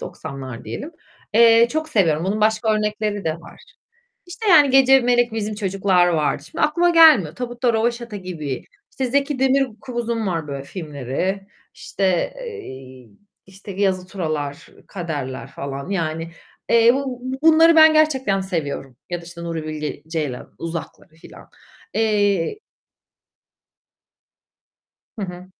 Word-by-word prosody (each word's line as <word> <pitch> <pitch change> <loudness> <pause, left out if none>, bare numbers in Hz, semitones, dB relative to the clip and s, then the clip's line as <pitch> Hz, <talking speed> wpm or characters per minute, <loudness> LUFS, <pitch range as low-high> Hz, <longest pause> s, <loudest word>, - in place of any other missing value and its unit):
90'lar 135 -5 -8
diyelim. 315 +4 -6 0.4
Eee, 230 0 +6
çok 315 0 -2
seviyorum. 170 - +1
Onun 210 +3 -1
başka 220 +1 +2
örnekleri 210 -1 -2
de 160 -1 0
var. 170 - -15 0.7
İşte, 395 +5 -5
yani, 300 -6 +7
Gece, 270 0 +6
Melek, 245 -1 +2
Bizim 215 -1 -3
Çocuklar 195 -3 +2
vardı. 150 -3 0
Şimdi 165 - -5
aklıma 345 +3 +2
gelmiyor. 310 - +6
Tabutta 245 -1 -1
Röveşata 235 0 -1
gibi, 160 -9 -5 0.3
işte, 265 - -2
Zeki 280 +2 0
Demirkubuz'un 240 -3 -1
var 165 -5 -2
böyle 140 -1 -5
filmleri, 160 +5 -4 0.3
işte, 185 -3 -1
eee, 130 - -10 0.4
işte, 195 +1 -11
Yazı 185 -2 0
Tura'lar, 155 -7 -4 0.2
Kader'ler 150 -8 -5
falan, 140 +3 -7
yani. 165 -3 -3 0.4
Eee, 230 0 +6
bu 265 -2 -4 0.2
bunları 325 +1 +6
ben 315 0 +8
gerçekten 265 -10 +2
seviyorum 145 -8 -4
ya 175 -1 -3
da, - - -13
işte, 170 0 -10
Nuri 165 -2 -4
Bilge 155 -1 -5
Ceylan 150 -6 -4
Uzak'ları 165 -2 -7 0.2
falan. - - -15 0.4
Eee 205 - +1 2.6
Hı 210 - -3
hı. 180 0 -9
195 Hz, 125 wpm, -21 LUFS, 160-245 Hz, 2.6 s, ben